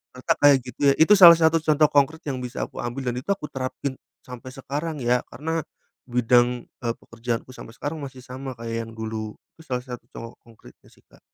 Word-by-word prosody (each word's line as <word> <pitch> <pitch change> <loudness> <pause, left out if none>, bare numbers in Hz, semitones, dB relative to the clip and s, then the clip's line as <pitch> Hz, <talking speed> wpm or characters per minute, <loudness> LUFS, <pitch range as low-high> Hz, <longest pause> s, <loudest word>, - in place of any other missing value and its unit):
ternyata 125 - +1
kayak 145 -1 +7
gitu 125 - -10
ya." - - +3
Itu 160 +6 +7
salah 170 -3 +11
satu 160 0 +4
contoh 155 -1 +4
konkret 145 +3 +2
yang 135 -3 -2
bisa 125 +1 -4
aku - - -11
ambil, 125 +1 -3
dan - - -6
itu 130 - -14
aku 195 -6 -2
terapin 130 +1 -4 0.3
sampai 125 0 -9
sekarang 145 +3 -4
ya, 120 +1 +3
karena 160 +3 -3 0.5
bidang, 120 0 +3 0.2
eee, 115 -1 -1
pekerjaanku 115 +2 -5
sampai 115 - -11
sekarang 150 +6 -4
masih 130 -2 -9
sama 130 +1 -7
kayak 115 0 -4
yang - - -11
dulu. 110 -1 -5 0.2
Itu 160 - -16
salah 125 -1 -2
satu 125 -3 -8
contoh 115 0 -9
konkretnya 115 -2 -18
sih, - - -25
Kak. - - -22
130 Hz, 200 wpm, -24 LUFS, 120-145 Hz, 0.5 s, salah